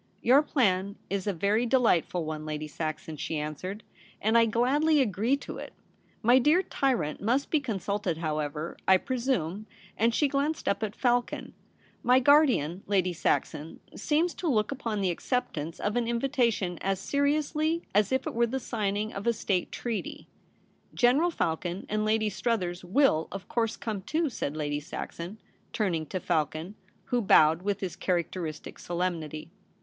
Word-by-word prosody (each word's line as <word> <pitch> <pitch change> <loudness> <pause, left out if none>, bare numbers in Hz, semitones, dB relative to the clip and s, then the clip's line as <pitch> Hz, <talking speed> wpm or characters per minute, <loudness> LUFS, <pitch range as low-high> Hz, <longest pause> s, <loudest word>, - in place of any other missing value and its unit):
* - - -37
Your 260 +5 +6
plan 200 -9 +1 0.2
is 200 0 -2
a - - +3
very 205 +6 +1
delightful 185 -9 +2
one, 155 0 -4
Lady 155 0 -4
Saxon,' 155 +1 -5
she 155 +1 -3
answered, 170 +8 -5 0.2
' - - -26
and 220 +2 +1
I 230 0 +6
gladly 285 +8 +3
agree 235 +2 +1
to - - -8
it. - - -8 0.5
My 245 +3 +6
dear 310 +8 +4
tyrant 240 - -1
must 250 +7 0
be 310 - +4
consulted 200 - -2
how 155 -2 -2
ever, 150 +2 -4
I 190 - +7
presume,' 220 - -2 0.3
and 230 +2 +3
she 295 - +3
glanced 285 +3 -1
up 200 - +1
at 215 -2 -3
Falcon. 245 -1 0 0.2
* - - -33
My 255 - +7
guardian, 250 - +4
Lady 185 -3 +1
Saxon, 160 -1 -1 0.2
seems 325 +3 +1
to 355 - -4
look 215 -6 +2
upon 230 -6 -3
the 185 -2 +2
acceptance 170 - -3
of 205 +2 -1
an 240 -1 +1
invitation 235 - 0
as 195 -1 0
seriously 305 - 0
as 205 +2 +3
if 260 - +1
it - - -3
were 235 +1 +2
the 265 +3 -2
signing 215 -2 -2
of 200 +3 -5
a 235 - +4
State 195 -4 -1
Treaty.' 235 -3 -4 0.4
* - - -37
General 285 +8 +4
Falcon 175 - -2
and 215 0 0
Lady 215 0 +2
Struthers 185 -8 -1
will, 185 - +3
of 195 0 -7
course, 230 -2 -1
come 215 -4 -4
too,' 315 - 0
said 155 -8 -3
Lady 145 -1 -1
Saxon, 170 +5 -7 0.4
turning 170 -7 0
to 185 - -3
Falcon, 160 +1 -1 0.3
who 245 -1 0
bowled 160 -5 +5
with 200 +1 -2
his 185 -3 -3
characteristic 170 -3 -3
solemnity. 165 -3 -3
205 Hz, 170 wpm, -28 LUFS, 170-250 Hz, 0.5 s, I